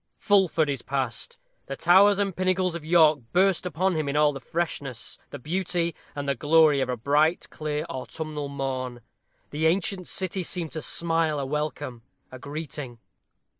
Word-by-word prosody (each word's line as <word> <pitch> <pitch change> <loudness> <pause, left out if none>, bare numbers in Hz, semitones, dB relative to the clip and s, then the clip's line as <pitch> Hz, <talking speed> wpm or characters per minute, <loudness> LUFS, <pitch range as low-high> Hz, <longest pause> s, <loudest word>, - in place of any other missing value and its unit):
Fulford 190 -6 +3
is 140 -4 -2
past. 130 -4 -3 0.3
The 135 - -4
towers 190 +6 +5
and 200 -3 -1
pinnacles 185 -1 +1
of 170 -2 -6
York 155 -2 +5
burst 185 0 +3
upon 180 +3 0
him 155 -3 -1
in 140 - -2
all 150 0 +4
the 135 - -6
freshness, 135 -5 -3
the - - -7
beauty, 170 +3 -1 0.2
and 145 -1 -4
the 140 - +2
glory 150 +1 +4
of 130 - -1
a 125 - -1
bright, 150 +7 +2
clear, 150 -1 -3
autumnal 150 +2 -5
morn. 130 -3 -4 0.5
The 155 +2 +1
ancient 185 +1 0
city 190 0 -2
seemed 175 -2 -4
to 160 - -4
smile 165 -1 +1
a 140 - -2
welcome 145 -4 -3 0.3
a 130 - -9
greeting. 145 -3 -6
155 Hz, 165 wpm, -26 LUFS, 140-175 Hz, 0.5 s, towers